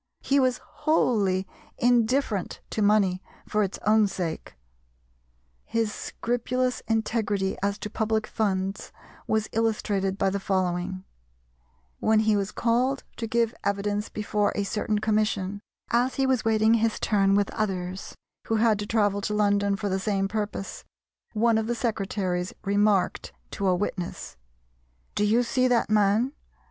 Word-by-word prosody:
He 280 Hz, +1 st, +3 dB
was 255 Hz, -2 st, +2 dB
wholly 205 Hz, -, +1 dB, 0.3 s
indifferent 240 Hz, -3 st, +1 dB
to 215 Hz, -, -1 dB
money 200 Hz, -3 st, +3 dB, 0.3 s
for 210 Hz, -, +1 dB
its 195 Hz, -2 st, -1 dB
own 215 Hz, 0 st, +5 dB
sake. 175 Hz, -, -4 dB, 1.1 s
His 225 Hz, -2 st, -1 dB
scrupulous 250 Hz, +2 st, -2 dB
integrity 220 Hz, -3 st, 0 dB
as 200 Hz, +1 st, 0 dB
to 210 Hz, -, -6 dB
public 220 Hz, 0 st, 0 dB
funds 195 Hz, -2 st, -2 dB, 0.4 s
was 220 Hz, 0 st, +1 dB
illustrated 205 Hz, -3 st, 0 dB
by 195 Hz, -1 st, +1 dB
the 200 Hz, -, -1 dB
following: 185 Hz, -1 st, -1 dB, 1.0 s
When 220 Hz, 0 st, +3 dB
he 215 Hz, -1 st, +3 dB
was 200 Hz, 0 st, -1 dB
called 250 Hz, +4 st, +1 dB
to 230 Hz, -, -3 dB
give 230 Hz, 0 st, +1 dB
evidence 205 Hz, +1 st, -1 dB
before 210 Hz, -1 st, 0 dB
a 205 Hz, -, 0 dB
certain 210 Hz, +1 st, -1 dB
commission, 210 Hz, -2 st, 0 dB, 0.3 s
as 245 Hz, +2 st, +2 dB
he 270 Hz, -, +1 dB
was 260 Hz, -3 st, +1 dB
waiting 220 Hz, 0 st, +3 dB
his 225 Hz, -1 st, +1 dB
turn 195 Hz, -2 st, +3 dB
with 200 Hz, -1 st, +1 dB
others 190 Hz, -3 st, -3 dB, 0.3 s
who 225 Hz, -, +1 dB
had 220 Hz, -1 st, +3 dB
to 205 Hz, -, -4 dB
travel 205 Hz, -2 st, +1 dB
to 210 Hz, +1 st, -2 dB
London 200 Hz, -1 st, +2 dB
for 205 Hz, 0 st, -3 dB
the 190 Hz, 0 st, 0 dB
same 195 Hz, -1 st, 0 dB
purpose, 210 Hz, -1 st, -4 dB, 0.5 s
one 225 Hz, 0 st, +3 dB
of 220 Hz, -, -2 dB
the 240 Hz, -, 0 dB
secretaries 195 Hz, -5 st, -2 dB
remarked 200 Hz, -1 st, +1 dB, 0.2 s
to 200 Hz, -, -2 dB
a 185 Hz, -, +4 dB
witness, 180 Hz, -2 st, -4 dB, 0.8 s
"Do -, -, 0 dB
you 225 Hz, +4 st, +3 dB
see 255 Hz, +1 st, +1 dB
that 240 Hz, -3 st, +2 dB
man?" 215 Hz, +5 st, +3 dB
210 Hz, 145 wpm, -26 LUFS, 195-225 Hz, 1.1 s, own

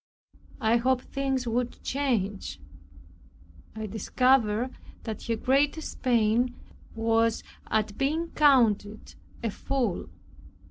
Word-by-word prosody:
I 225 Hz, +2 st, +3 dB
hoped 255 Hz, +1 st, +1 dB
things 270 Hz, -2 st, -1 dB
would 240 Hz, +1 st, -2 dB
change. 210 Hz, -, -1 dB, 1.2 s
I 220 Hz, 0 st, -4 dB
discovered 230 Hz, +2 st, +2 dB, 0.3 s
that 220 Hz, -3 st, -5 dB
her 230 Hz, -, +1 dB
greatest 280 Hz, +7 st, 0 dB
pain 240 Hz, 0 st, +2 dB, 0.4 s
was 225 Hz, 0 st, +1 dB, 0.2 s
at 215 Hz, -1 st, -1 dB
being 315 Hz, +5 st, 0 dB
counted 230 Hz, -8 st, +3 dB, 0.3 s
a 225 Hz, -, 0 dB
fool. 245 Hz, -5 st, -2 dB
235 Hz, 95 wpm, -27 LUFS, 220-265 Hz, 1.2 s, I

